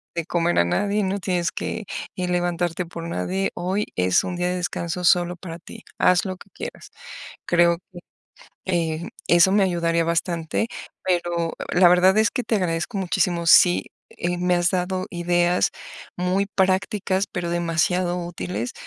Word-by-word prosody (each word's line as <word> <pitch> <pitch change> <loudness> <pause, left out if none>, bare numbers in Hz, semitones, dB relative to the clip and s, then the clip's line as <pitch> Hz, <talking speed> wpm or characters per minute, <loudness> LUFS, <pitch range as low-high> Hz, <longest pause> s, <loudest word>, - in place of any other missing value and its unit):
de 170 -2 -2
comer 175 -1 +1
a - - +5
nadie, 205 - 0
no 190 +1 -1
tienes 180 -2 -1
que 220 - -4 0.3
levantarte 175 -1 -1
por 170 0 -8
nadie, 190 +3 -1
hoy 190 +4 -1
es 90 0 +2
un 180 - -4
día 180 0 -1
de 180 - -1
descanso 175 0 -3
solo 175 0 +3
para 170 -1 -8
ti, 170 - -12 0.2
haz 180 +1 +4
lo 185 -1 -4
que - - -16
quieras". - - -8 0.6
Creo 170 0 +3
que, 175 - -10 0.7
eh, 170 -2 -1 0.2
eso 175 +2 +5
me 205 0 +4
ayudaría 170 -2 +1
bastante, 170 +3 -1 0.4
pero 175 -2 0 0.2
la 180 0 +6
verdad 180 +3 +5
es 220 - +4
que 250 - -2
te 225 - -1
agradezco 180 +3 -2
muchísimo. 175 -2 0
Sí, 175 +2 +6 0.2
eh, 175 +1 -3
me 180 0 +2
has 175 0 +2
dado 185 0 -1
ideas 175 0 +1 0.5
muy 185 +3 0
prácticas, 190 0 +1
pero 175 -1 -3
demasiado 175 +1 0
útiles 115 - -4
175 Hz, 155 wpm, -23 LUFS, 170-185 Hz, 0.7 s, la